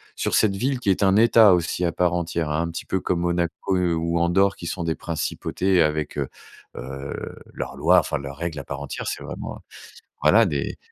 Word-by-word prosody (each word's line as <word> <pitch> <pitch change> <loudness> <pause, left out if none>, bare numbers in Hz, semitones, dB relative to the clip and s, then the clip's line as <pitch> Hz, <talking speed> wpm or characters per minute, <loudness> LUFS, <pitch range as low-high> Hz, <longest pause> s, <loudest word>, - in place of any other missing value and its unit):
sur - - -2
cette 100 -3 +3
ville 130 +5 -1
qui 100 - -1
est 95 +2 +2
un 95 0 +4
État 110 -3 +6
aussi 85 +1 0
à 85 - +1
part 90 0 +1
entière, 85 -2 -2
hein. 75 +2 0
Un 85 - -3
petit - - -6
peu 95 - 0
comme 90 -1 -1
Monaco 85 +2 -1
ou 85 -1 0
Andorre, 95 +3 +3
qui 85 - -10
sont 85 0 -3
des 80 -1 -1
principautés 90 +2 -1
avec, 75 -1 -2
heu, 70 -2 -1 0.5
heu, 70 +2 -6 0.4
leurs - - -5
lois, 85 +5 +5
enfin 75 - -2
leurs 70 +1 -8
règles 85 -3 -4
à - - -6
part 70 0 -6
entière. 70 - -5
C'est - - -4
vraiment, - - -7 0.7
voilà, 115 +1 +6
des 70 -7 -2
85 Hz, 210 wpm, -23 LUFS, 75-95 Hz, 0.7 s, État